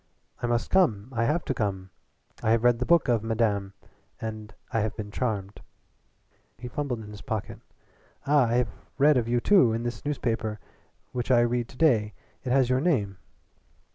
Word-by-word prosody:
I 120 - 0
must 120 0 -1
come. 125 - +2
I 115 -2 0
have 155 +6 0
to - - -1
come. 95 -5 -3 0.5
I - - 0
have 115 +1 +3
read 120 -1 +4
the 125 - -2
book 170 -1 +4
of 120 -3 +2
Madame, 110 -3 0 0.5
and 110 -1 -6 0.2
I 115 - +1
have 110 0 -2
been 105 -2 -6
charmed" 105 -4 -3 1.0
he 125 - -7
fumbled 125 -2 -3
in 105 -1 -10
his 105 - -10
pocket 110 -5 -4 0.7
"ah 140 -3 +4
I 115 - 0
have 125 -3 +2 0.3
read 145 +2 +5
of 120 -3 +1
you 120 +1 +2
too. 130 - +4
In 115 +1 -2
this 120 0 -4
newspaper 115 -6 -2 0.5
which 125 0 -4
I 120 -2 +5
read 120 0 0
to - - -15
day 110 - +2 0.3
it 125 - -3
has 130 -1 +4
your 130 +1 +1
name." 105 - 0
120 Hz, 185 wpm, -27 LUFS, 110-130 Hz, 1.0 s, read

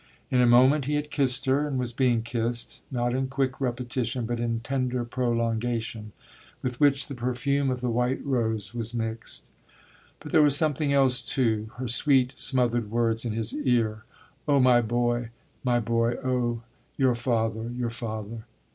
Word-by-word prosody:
In 125 - +3
a 125 - +5
moment 130 +4 +5
he 150 +2 0
had 150 0 -3
kissed 135 -3 +1
her 140 +3 +2
and 140 -3 -2
was 125 -2 -2
being 120 -3 +2
kissed, 115 0 -3
not 120 -2 -1
in 130 +1 0
quick 135 0 -2
repetition, 125 -1 -2
but 120 +1 -3
in 115 -1 -1
tender 125 -1 -2
prolongation, 115 -2 -2 0.5
with 125 -1 -3
which 140 -2 +3
the 140 - -7
perfume 130 +3 -1
of 125 -1 -2
the 125 - -1
white 125 +3 -1
rose 110 -6 -1
was 115 0 -4
mixed. 115 0 -4 0.7
But - - -9
there - - +5
was 145 -2 +5
something 150 -2 +1
else 135 -3 +4
too 115 -4 0
her 130 0 -4
sweet 130 +1 +3
smothered 120 -4 +1
words 115 0 0
in 115 - -2
his 110 0 -2
ear: 115 -6 0 0.4
"Oh 140 -1 +4
my 125 -2 +5
boy, 120 +1 0 0.3
my 120 -2 +2
boy 115 +1 0
oh 120 -2 -1 0.3
your 130 -3 +3
father, 115 -2 -1
your 120 -1 -3
father!" 110 -1 -6
120 Hz, 165 wpm, -26 LUFS, 115-130 Hz, 0.7 s, a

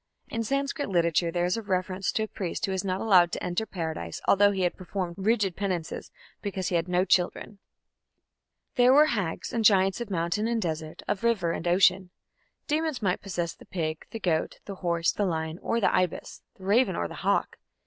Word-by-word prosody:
In 230 - -2
Sanskrit 275 +2 -1
literature 170 -2 +2
there 175 +1 0
is 180 +4 0
a - - -3
reference 185 -1 -1
to 220 - 0
a - - -3
priest 185 -5 -3
who 195 - -3
was 190 -1 -1
not 185 -1 -2
allowed 180 -6 +5
to - - -3
enter 180 +5 -1
Paradise, 160 - -4
although 205 +1 +6
he 195 -2 -1
had 175 - +1
performed 185 -1 -4
rigid 200 -3 +1
penances, 185 -5 -3 0.3
because 195 -3 -3
he 180 - -1
had 165 +1 +1
no 180 +1 +2
children. 190 +2 0 1.2
There 250 +1 +6
were 295 +2 +7
hags 205 - -2
and 230 -2 0
giants 195 0 +4
of 235 - -5
mountain 175 +4 0
and 235 -1 0
desert, 160 -4 -4
of 200 - -2
river 210 -8 +2
and 170 - -3
ocean. 185 +1 +4 0.6
Demons 310 -5 -1
might 185 -2 +1
possess 175 -4 -3
the - - -16
pig, 155 -3 -3
the 225 - -6
goat, 165 -5 -1
the 200 -2 -7
horse, 170 -2 +1
the 205 - -2
lion, 160 0 -3
or 230 - -1
the 215 - +2
ibis, 185 -2 -1 0.2
the 190 - -15
raven, 220 +7 +3
or - - -1
the - - -9
hawk. - - 0
185 Hz, 200 wpm, -27 LUFS, 175-215 Hz, 1.2 s, were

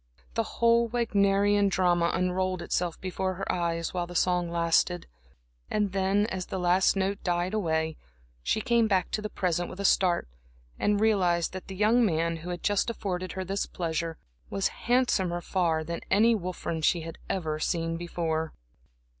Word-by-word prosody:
The - - -3
whole 235 0 +4
Wagnerian 205 -3 +2
drama 175 -3 +2
unrolled 185 0 0
itself 175 -2 -1
before 185 0 -2
her 195 - -2
eyes 170 -1 -1
while 175 -1 -2
the 175 - -9
song 180 0 +2
lasted. 170 +1 +1 0.6
And 210 -2 0
then, 195 +1 +2
as 190 -5 -4
the - - -4
last 180 +2 +3
note 195 +1 -1
died 175 +2 0
away, 160 -6 0 0.4
she 215 - 0
came 235 -2 +3
back 190 -4 +1
to 215 - -1
the 210 - -4
present 175 -3 -1
with 185 - -9
a 200 - -2
start, 180 - +3 0.5
and 205 0 +2
realized 180 -6 +2
that 190 - -7
the 190 - -7
young 220 +5 +4
man 165 -4 +1
who 165 +2 -8
had 175 -1 -5
just 205 +2 +1
afforded 185 -5 -3
her 190 - -3
this 195 +2 -2
pleasure 165 -1 -3 0.3
was 195 - 0 0.2
handsomer 205 -9 +2
far 170 -3 0
than 170 +1 -5
any 220 +4 +5
Wolfram 180 -5 -3
she 170 +2 +2
had 165 0 -8
ever 155 -5 -2
seen 165 +1 -1
before. 165 -2 -2
185 Hz, 170 wpm, -28 LUFS, 170-200 Hz, 0.6 s, any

